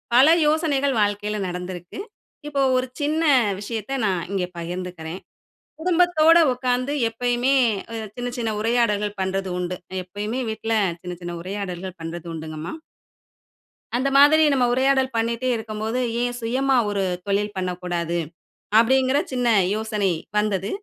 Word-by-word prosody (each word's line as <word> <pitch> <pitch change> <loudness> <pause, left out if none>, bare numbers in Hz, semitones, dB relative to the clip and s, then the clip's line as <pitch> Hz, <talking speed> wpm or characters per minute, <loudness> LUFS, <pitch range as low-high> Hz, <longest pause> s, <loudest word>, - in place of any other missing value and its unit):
பல 260 +4 +8 0.2
யோசனைகள் 285 -4 +1
வாழ்க்கையில 205 +1 -1
நடந்திருக்கு. 180 - -6 0.5
இப்போ 285 -2 -1 0.2
ஒரு 255 0 0
சின்ன 310 +3 +1 0.4
விஷயத்த 220 +3 -4
நான் 185 -4 0
இங்க 185 -2 0
பகிர்ந்துக்கிறேன். 175 0 -6 0.6
குடும்பத்தோட 340 -1 +4
உட்கார்ந்து 250 +2 -1 0.2
எப்பையுமே 245 +3 +1 0.6
சின்ன, 245 0 -3
சின்ன 230 -2 -1
உரையாடல்கள் 210 -3 +1
பண்றது 190 0 -2
உண்டு. 180 0 -3 0.3
எப்பையுமே 210 +7 -4
வீட்ல 225 +1 -2 0.3
சின்ன 180 0 -6
சின்ன 175 0 -5
உரையாடல்கள் 185 -1 -5
பண்றது 170 +1 -6
உண்டுங்கம்மா. 155 +1 -6 1.2
அந்த 265 +3 +1
மாதிரி 305 +3 +7
நம்ப 255 -2 +3
உரையாடல் 265 0 +2
பண்ணிட்டே 235 +3 0
இருக்கும்போது, 220 +1 -3 0.2
"ஏன் 245 0 -1
சுயமா 260 +3 +1
ஒரு 200 -1 -1 0.2
தொழில் 205 +1 0
பண்ணக்கூடாது!" 175 -2 -2 0.6
அப்டீங்குற 260 +3 +3
சின்ன 250 -1 0 0.3
யோசனை 215 -3 0 0.3
வந்தது. 200 -2 0
220 Hz, 120 wpm, -23 LUFS, 185-260 Hz, 1.2 s, பல